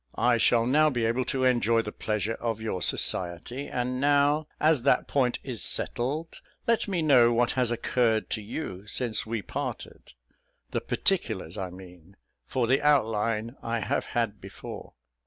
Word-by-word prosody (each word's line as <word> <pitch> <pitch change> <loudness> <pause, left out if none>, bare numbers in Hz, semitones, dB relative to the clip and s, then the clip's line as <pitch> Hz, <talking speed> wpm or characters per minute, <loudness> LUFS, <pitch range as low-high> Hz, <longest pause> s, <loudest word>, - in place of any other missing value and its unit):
I 120 -1 +3
shall 115 +1 +4
now 150 +5 +4
be 120 -5 -1
able 120 +3 0
to 130 -1 -1
enjoy 115 -3 +3
the 105 - -5
pleasure 110 +1 -2
of 115 -2 -2
your 110 -5 -3
society; 95 - 0
and 125 +1 -2
now, 145 +2 +3
as 155 -3 +3
that 140 - +2
point 125 -3 +1
is 125 -5 -6
settled, 150 +7 -2 0.3
let 230 -1 +1
me 180 -5 -1
know 125 -6 +6
what 120 0 +2
has 125 -3 +1
occurred 120 -1 +1
to 110 - -2
you 100 - -6
since 110 -1 0
we 110 -2 -3
parted - - -6 0.6
the - - -1
particulars 110 - -1
I 95 -1 -4
mean, 90 0 -14 0.3
for 125 -2 0
the 130 +4 +2
outline 115 -4 +1
I 115 0 -2
have - - -1
had 115 -3 -1
before." - - -9
120 Hz, 160 wpm, -27 LUFS, 110-135 Hz, 0.6 s, know